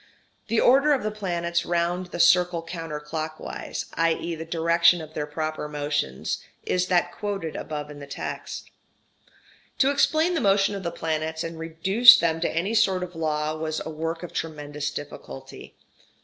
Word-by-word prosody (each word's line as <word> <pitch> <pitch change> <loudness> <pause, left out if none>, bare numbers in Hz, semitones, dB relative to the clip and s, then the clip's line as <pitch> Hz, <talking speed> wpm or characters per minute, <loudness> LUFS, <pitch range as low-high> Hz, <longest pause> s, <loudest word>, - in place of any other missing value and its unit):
The 225 0 +1
order 275 +4 +5
of 270 - 0
the 215 - -1
planets 170 -4 -1
round 175 +1 -1
the 175 - -7
circle 175 -1 +4
counter 165 -3 -5
clockwise, 155 +1 -5
i.e. 165 +1 0
the 160 0 -6
direction 170 +1 +4
of 155 -1 -9
their 150 -1 -3
proper 155 0 -3
motions, 145 - -2 0.2
is 180 0 0
that 180 -2 +2
quoted 200 -6 -4
above 150 -1 -5
in 145 - -10
the 140 - -9
text. 140 - -6 1.1
To 270 +1 +4
explain 315 +4 +2
the 330 - 0
motion 195 0 +3
of 200 - -4
the 170 - -2
planets 160 0 -2
and 165 -1 -6
reduce 190 +9 +7
them 165 -1 0
to - - +1
any 180 +7 -1
sort 195 -5 +3
of 180 -1 -8
law 155 -1 -1
was 155 0 -3
a 160 - -5
work 165 +2 -4
of 175 - -7
tremendous 150 -2 -4
difficulty. 140 - -9
165 Hz, 165 wpm, -25 LUFS, 155-185 Hz, 1.1 s, reduce